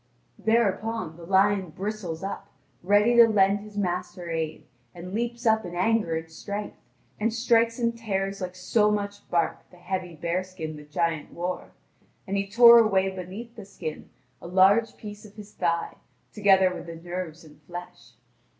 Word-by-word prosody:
Thereupon 225 -4 0
the 170 0 -12
lion 195 -1 +3
bristles 190 -1 -5
up, 195 - -5 0.3
ready 205 +6 +4
to 235 -1 +9
lend 200 -2 +3
his 210 0 -11
master 180 -2 -3
aid, 160 -2 -3 0.3
and 180 +2 -8
leaps 235 +2 -3
up 220 -1 +4
in 175 - -7
his 175 - -4
anger 210 -4 +2
and 160 0 -7
strength, 205 +5 -6 0.4
and 225 +2 +1
strikes 230 0 +2
and 235 -1 0
tears 195 -4 -3
like 180 0 -4
so 210 +3 +2
much 205 -1 -3
bark 170 -1 -1
the 180 - -18
heavy 180 -1 -4
bearskin 170 0 -3
the 150 0 -11
giant 160 0 -2
wore, 180 +1 -4 0.5
and 195 0 -3
he 200 0 -1
tore 235 +2 +9
away 195 -4 +3
beneath 200 +6 -8
the 220 - -9
skin 170 -5 -7 0.3
a - - -8
large 195 +5 +4
piece 210 -1 -9
of 210 -1 -14
his 210 -1 -11
thigh, 170 -1 -1 0.4
together 190 -3 +4
with 180 - -8
the 165 - -7
nerves 175 -1 -6
and 150 -1 -17
flesh. 150 -8 -10
190 Hz, 170 wpm, -26 LUFS, 175-215 Hz, 0.5 s, to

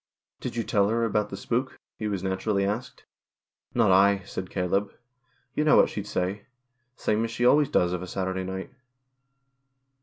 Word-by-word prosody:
" - - -67
Did - - -4
you 115 - 0
tell 100 -1 +2
her 115 +1 +1
about 105 -1 0
the 100 - -6
spook? 125 +6 -2
" - - -67
he 110 - -2
was 100 -3 -2
naturally 100 +1 0
asked. 105 +5 -4 0.7
"Not 115 -5 +4
I," 100 +1 +5
said 95 -1 -6
Caleb. 100 +2 0 0.6
"Yon 150 - 0
know - - +7
what - - +6
she'd 105 -1 -5
say. 95 +3 -2 0.5
Same 110 -2 0
as 115 - -2
she 120 +2 -1
always 145 +3 +5
does 90 0 +2
of 90 - -2
a 90 - -6
Saturday 95 0 -2
night." 95 0 -5
100 Hz, 185 wpm, -26 LUFS, 95-115 Hz, 0.7 s, know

